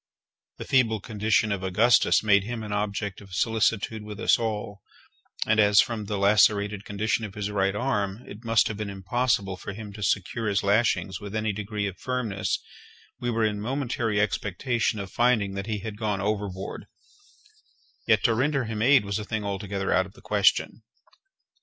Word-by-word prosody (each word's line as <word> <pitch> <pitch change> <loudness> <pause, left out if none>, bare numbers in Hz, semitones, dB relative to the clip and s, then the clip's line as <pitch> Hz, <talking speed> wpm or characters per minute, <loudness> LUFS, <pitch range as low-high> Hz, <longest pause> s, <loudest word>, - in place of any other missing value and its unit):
The - - -7
feeble 115 -5 +2
condition 110 0 0
of 100 -2 -1
Augustus 105 +7 +3
made 100 -2 +4
him 115 +1 -5
an 105 - -6
object 105 -1 -2
of 95 -3 -10
solicitude 110 +1 0
with 105 0 -8
us - - +3
all; 105 -3 -3 0.6
and 110 0 +2
as, 105 -1 +6
from 115 -4 +1
the 105 0 -3
lacerated 100 0 +3
condition 110 +2 -1
of 105 -3 -6
his 105 0 -3
right 100 -1 +1
arm, 105 -2 -1
it 105 +4 -10
must 115 -1 +3
have 105 - -4
been 105 -1 -4
impossible 100 0 -1
for 100 - -7
him 105 0 -8
to 105 - -10
secure 105 +3 -1
his 100 -1 +1
lashings 100 -3 +1
with 105 +1 -7
any 110 -1 0
degree 105 0 -3
of 95 -2 -5
firmness, 125 -7 -2 0.6
we 120 - -2
were 115 -1 +1
in 105 -1 -1
momentary 120 -3 -1
expectation 105 +4 0
of 100 -2 -6
finding 120 -5 +2
that 100 +1 -5
he 105 -3 -2
had 110 0 -7
gone 105 -3 -1
overboard—yet 105 - -5
to 120 - +4
render 135 +3 +1
him 110 -2 -4
aid 130 -1 +5
was 100 +1 -2
a - - -4
thing 110 0 -3
altogether 100 -1 -2
out 95 0 +2
of 95 - -17
the - - -17
question. - - +2
105 Hz, 180 wpm, -26 LUFS, 100-115 Hz, 0.6 s, as